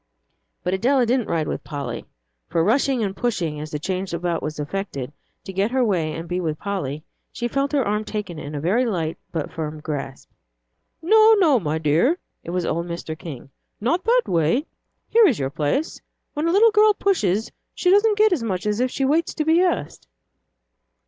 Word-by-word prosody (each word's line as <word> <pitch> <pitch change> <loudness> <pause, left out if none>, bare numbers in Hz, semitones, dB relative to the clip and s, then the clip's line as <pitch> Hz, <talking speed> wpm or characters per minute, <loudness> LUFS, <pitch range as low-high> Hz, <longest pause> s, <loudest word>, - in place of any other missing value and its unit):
But 180 - -1
Adela 245 +6 +3
didn't 245 0 +1
ride 160 -2 0
with - - -4
Polly. 145 -3 -5 0.4
For 165 - +1
rushing 250 +4 +2
and 195 -2 -2
pushing 175 -11 -2
as 155 +1 -6
the 150 - -3
change 185 +3 -3
about 170 0 -1
was 150 0 -4
effected, 145 -4 -4 0.3
to 190 - -8
get 195 +3 +1
her 255 0 +2
way 170 -7 0
and 165 +2 -6
be 180 +1 -2
with 155 -3 -2
Polly, 155 -7 -4 0.3
she 240 - -3
felt 275 +3 -1
her 275 -4 +2
arm 210 +1 0
taken 205 -7 -5
in 145 0 -7
a - - -2
very 190 - +2
light 170 -9 -2
but 160 -3 -3
firm 155 -1 -5
grasp. 145 -3 -5 0.8
"No, 440 +5 +6
no, 315 -10 +4
my 155 -4 -1
dear," 160 - +2 0.3
it - - -8
was 180 0 -1
old 170 +2 -1
Mr. 170 -2 -5
King, 140 -5 -9 0.3
"not 335 - 0
that 485 +2 +4
way. 170 - +1 0.4
Here 455 -2 +6
is 265 - +2
your 135 -1 -2
place. 155 - -1 0.3
When 300 +2 -1
a - - +2
little 435 +5 +6
girl 425 0 +5
pushes, 220 - +1 0.2
she 360 - +2
doesn't 410 +1 +4
get 425 -2 +5
as 315 - -1
much 195 -5 -2
as 210 +1 0
if 255 +1 +2
she 270 - -1
waits 315 +5 +1
to 305 - -1
be 325 +2 +4
asked." 350 - -1
200 Hz, 195 wpm, -22 LUFS, -, 0.8 s, No